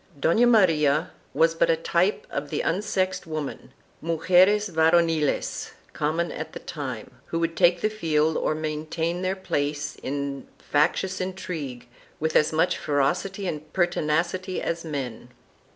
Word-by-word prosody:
1" 140 - -21
Dona 225 - +4
Maria 160 -8 +3 0.2
was 165 0 +3
but 165 - +2
a 165 - +5
type 170 +4 0
of 145 +1 -3
the 150 - -1
unsexed 185 -1 -1
women, 155 -3 -5 0.3
mugeres 180 +6 +4
varoniles, 160 -3 +1 0.2
common 160 +3 -1
at - - -6
the - - -6
time, 130 -8 -6 0.2
who 165 - -2
would 165 0 -1
take 175 -1 +4
the - - +3
field 160 -7 +1
or 155 - 0
maintain 155 +3 -2
their 185 +1 0
place 145 -5 -2
in 140 0 -4
factious 180 +6 0
intrigue 165 -9 -5 0.3
with 160 +1 -1
as 150 - +4
much 160 +3 +1
ferocity 175 +8 0
and 155 -2 -5
pertinacity 175 +1 0
as 170 0 -3
men. 130 -7 -5
165 Hz, 140 wpm, -25 LUFS, 150-180 Hz, 0.3 s, a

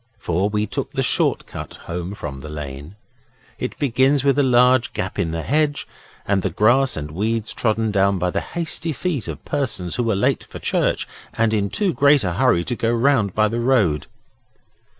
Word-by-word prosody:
For 95 +1 0
we 105 0 0
took - - -5
the - - 0
short - - +1
cut - - -8
home 90 +3 -4
from 70 -8 -6
the 75 - -9
lane 75 +3 -7 0.6
it - - -4
begins 135 +1 +2
with 140 0 +3
a - - +6
large 125 -1 +4
gap 95 - -4
in 85 - 0
the 80 0 -3
hedge 150 0 0 0.4
and 100 -1 +1
the 95 - -1
grass 120 +8 +3
and 75 -1 -5
weeds 110 +5 -1
trodden 110 -1 0
down 100 -1 +2
by 90 0 0
the - - -1
hasty 165 -1 -3
feet 145 - -3
of - - -7
persons 115 -11 -2
who 125 - +1
were 115 -3 +1
late 100 - +1
for - - -10
church - - 0 0.3
and 115 -1 +2
in 100 -2 +1
too 195 - 0
great 140 -2 +4
a 90 -2 -1
hurry 110 -4 +3
to 120 - -3
go 115 0 0
round 120 -5 +2
by 110 0 +3
the 115 +3 -2
road. 110 - +2
110 Hz, 195 wpm, -21 LUFS, 90-130 Hz, 0.6 s, a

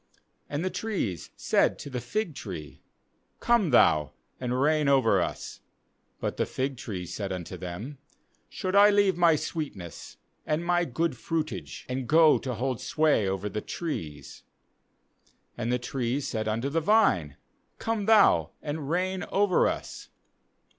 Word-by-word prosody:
10And 145 +3 -2
the 185 - -1
trees 120 - -3
said - - +2
to - - -8
the 125 -3 -4
fig 210 - -2
tree: 90 - -8 0.6
Come 235 -7 +3
thou, 75 - +4 0.3
and 125 0 -1
reign 150 +1 +2
over 120 -9 +4
us. - - -5 0.6
uBut - - -2
the - - 0
fig 135 +1 -2
tree 100 -7 -5
said 95 +3 -5
unto 90 0 -5
them: 95 - -7 0.5
Should 185 -1 -3
I 205 +1 +8
leave 200 -2 +3
my 170 -2 +5
sweetness, 145 - -6 0.3
and 155 +2 -1
my 175 0 +2
good 160 +1 -1
fruitage, 155 +6 -4
and 125 -1 -3
go 160 -1 +6
to 130 -2 -4
hold 130 +1 -2
sway 155 -10 +2
over 95 +1 -2
the 105 +1 -4
trees? 80 - -6 1.2
12And 115 0 -2
the 125 - +2
trees 125 +2 -2
said 110 -2 -3
unto 115 +5 -1
the 165 +3 0
vine: 150 - +3 0.4
Come 225 -3 -2
thou, 220 -2 +5
and 145 -1 -5
reign 185 +2 -1
over 195 -2 +3
us. - - -5
140 Hz, 145 wpm, -27 LUFS, 110-170 Hz, 1.2 s, I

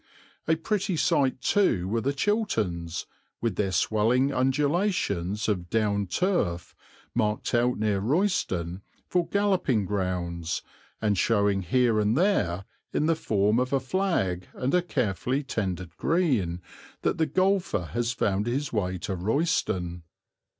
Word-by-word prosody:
A 160 - +4
pretty 190 +2 -1
sight 135 -4 +2
too 120 - +2
were 115 +3 0
the 140 - 0
Chilterns, 110 - -1 0.3
with 115 -5 -1
their 95 0 0
swelling 115 - +2
undulations 135 - 0
of 90 -5 -1
down 100 -3 +1
turf, 90 - 0 0.4
marked 105 -3 0
out 120 +1 +2
near 105 -2 +1
Royston 100 - 0 0.3
for 180 -2 +1
galloping 185 - +1
grounds 90 -4 -2 0.4
and 105 -1 +2
showing 100 -3 +2
here 115 +4 +2
and 105 +4 +2
there, 100 - +1 0.3
in 150 - +1
the 165 +1 +3
form 105 -5 +1
of 125 0 -1
a 135 - +3
flag 130 - -1
and 130 +2 -1
a 180 - +4
carefully 125 - -1
tended 95 -9 -3
green, 115 - +1 0.4
that - - 0
the 160 - +3
golfer 185 - +1
has 120 0 0
found 105 -2 0
his 130 +2 -2
way 95 -4 -1
to 95 +2 -4
Royston. 90 - 0
115 Hz, 135 wpm, -27 LUFS, 95-150 Hz, 0.4 s, A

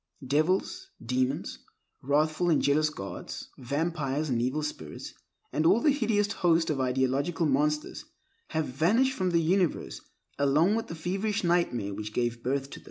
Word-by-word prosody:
Devils, 185 - 0 0.2
demons, 130 +3 -1 0.4
wrathful 155 +5 +1
and 160 - +4
jealous 150 +2 +2
gods, 100 -11 -7
vampires 150 +2 -2
and 120 -2 +1
evil 130 +5 -1
spirits, 80 - -6 0.4
and 155 - +1
all 185 +7 +5
the 295 +5 +4
hideous 220 -7 +1
host 170 -5 +2
of 150 - -1
the 130 - 0
ideological 135 +6 0
monsters, 150 +1 0 0.4
have 160 -1 -1
vanished 205 - +2
from 185 -7 0
the 170 - +2
universe 180 +1 0 0.4
along 150 +7 +3
with 225 0 -1
the 165 - -6
feverish 195 +6 -2
nightmare 170 - +1
which 105 +2 -6
gave 120 0 -1
them 125 - -1
birth. 140 0 -1
155 Hz, 155 wpm, -28 LUFS, 135-180 Hz, 0.4 s, all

